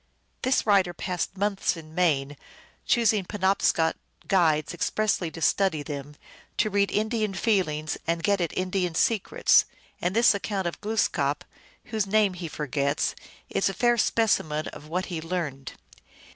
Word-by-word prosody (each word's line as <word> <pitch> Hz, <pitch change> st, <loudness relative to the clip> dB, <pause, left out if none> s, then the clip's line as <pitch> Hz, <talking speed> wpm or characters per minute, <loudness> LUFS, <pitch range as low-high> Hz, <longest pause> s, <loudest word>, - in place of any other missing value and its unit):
This 260 Hz, 0 st, +1 dB
writer 190 Hz, -5 st, +3 dB
passed 180 Hz, +2 st, -3 dB
months 200 Hz, -2 st, 0 dB
in 155 Hz, -1 st, -11 dB
Maine, 145 Hz, -5 st, +1 dB, 0.5 s
choosing 220 Hz, -4 st, +3 dB
Penobscot 190 Hz, -4 st, +1 dB, 0.3 s
guides 160 Hz, -5 st, +2 dB
expressly 185 Hz, 0 st, 0 dB
to 165 Hz, 0 st, -7 dB
study 185 Hz, -6 st, +2 dB
them, 145 Hz, 0 st, -7 dB, 0.4 s
to 215 Hz, -, +1 dB
read 200 Hz, 0 st, +2 dB
In 215 Hz, +1 st, 0 dB
dian 215 Hz, -4 st, -1 dB
feelings 160 Hz, -9 st, 0 dB
and 165 Hz, 0 st, 0 dB
get 200 Hz, -2 st, +2 dB
at 170 Hz, -, -1 dB
Indian 185 Hz, -2 st, -1 dB
secrets, 215 Hz, +3 st, +3 dB, 0.4 s
and 180 Hz, +3 st, -1 dB
this 230 Hz, 0 st, +6 dB
account 200 Hz, -1 st, -3 dB
of 170 Hz, -, -4 dB
Glooskap, 175 Hz, -9 st, 0 dB, 0.4 s
whose 220 Hz, -3 st, -2 dB
name 205 Hz, -1 st, +3 dB
he 175 Hz, -2 st, -6 dB
forgets, 140 Hz, -1 st, -1 dB, 0.3 s
is 195 Hz, -, 0 dB
a 195 Hz, -, -5 dB
fair 240 Hz, -1 st, +3 dB
specimen 180 Hz, -10 st, +1 dB
of 150 Hz, +1 st, -12 dB
what 180 Hz, +4 st, -2 dB
he 160 Hz, -, -3 dB
learned. 160 Hz, -6 st, -4 dB
185 Hz, 145 wpm, -26 LUFS, 155-205 Hz, 0.5 s, this